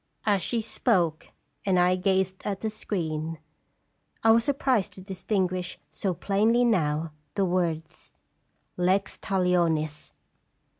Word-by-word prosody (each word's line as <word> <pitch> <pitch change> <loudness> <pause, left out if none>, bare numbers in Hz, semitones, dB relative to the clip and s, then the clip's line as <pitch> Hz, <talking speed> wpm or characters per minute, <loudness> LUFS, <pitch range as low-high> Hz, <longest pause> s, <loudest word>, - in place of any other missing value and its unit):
As 205 -3 +3
she 235 +4 -1
spoke 175 -9 +1 0.4
and 190 -2 +2
I 180 +1 +4
gazed 190 0 0
at 200 -2 -2
the 220 - -1
screen, 165 -6 -3 0.9
I 225 - +6
was 230 +1 +5
surprised 260 -7 +1
to 190 - -10
distinguish 185 -2 -2
so 190 -3 -2
plainly 220 +6 +2
now 160 -7 +1 0.2
the 195 - +2
words, 170 -3 -2 0.7
Lextalionis! 180 -4 +1
185 Hz, 110 wpm, -27 LUFS, 170-205 Hz, 0.9 s, I